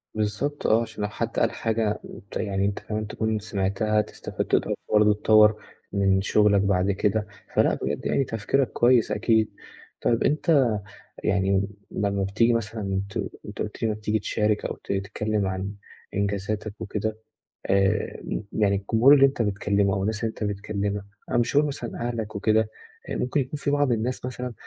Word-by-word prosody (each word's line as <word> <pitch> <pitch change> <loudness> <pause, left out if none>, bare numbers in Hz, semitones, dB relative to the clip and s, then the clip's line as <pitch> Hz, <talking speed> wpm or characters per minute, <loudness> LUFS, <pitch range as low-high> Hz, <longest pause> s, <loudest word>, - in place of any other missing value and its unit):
بالضبط 110 +8 -1
آه، 110 +1 +4
عشان 110 -2 -5
لو 105 - -1
حد 115 +1 -3
قال - - +2
حاجة 110 -2 -1
أنت 100 - -8
يعني 100 -2 -1
أنت 100 0 -1
كمان 110 0 -4
تكون 110 +1 -1
سمعتها 105 +1 0
تستفاد - - -5
تقدر - - +1 0.2
برضه 105 0 +6
تطوّر 105 0 +5 0.4
من 95 -1 +3
شغلك 100 0 +4
بعد 100 -1 +2
كده، 105 +2 0 0.3
فلأ - - +4
بجد - - -3
يعني 140 - +2
تفكيرك 120 +3 0
كويس 120 -3 +3
أكيد، 110 +1 +2 0.5
طيب 115 - +2
أنت 150 -4 +3 0.6
يعني 100 0 +2 0.2
لمّا 100 -1 -1
بتيجي 110 +5 +2
مثلًا 105 -4 -1
ت - - -13 0.3
أنت - - -9
قُلت - - -7
لي - - +3
لمّا 110 - 0
بتيجي 105 0 0
تشارك 105 0 0
أو - - -3
ت - - -3
تتكلم 105 +1 -1
عن 95 +2 -3 0.4
إنجازاتك 100 +1 -2
وكده، 110 +1 -3 0.5
آآ، 100 +2 +1 0.3
يعني 100 -2 +2
الجمهور 110 +7 +5
اللي 135 -1 +7
أنت 135 -2 0
بتكلمه 100 -1 +1
أو 95 - -1
الناس 105 +2 -1
اللي 115 - +1
أنت 110 - -6
بتكلمها 100 0 -2 0.2
أنا - - +1
مش 120 +3 +1
هاقول 150 +1 +5
مثلًا 120 -4 -4
أهلك 110 -2 -4
وكده، 110 +1 +2 0.4
ممكن 125 +4 0
يكون 135 +3 -4
في 140 - 0
بعض 145 -2 +2
الناس 120 +3 -1
مثلًا 125 -1 -5
105 Hz, 170 wpm, -25 LUFS, 100-115 Hz, 0.6 s, اللي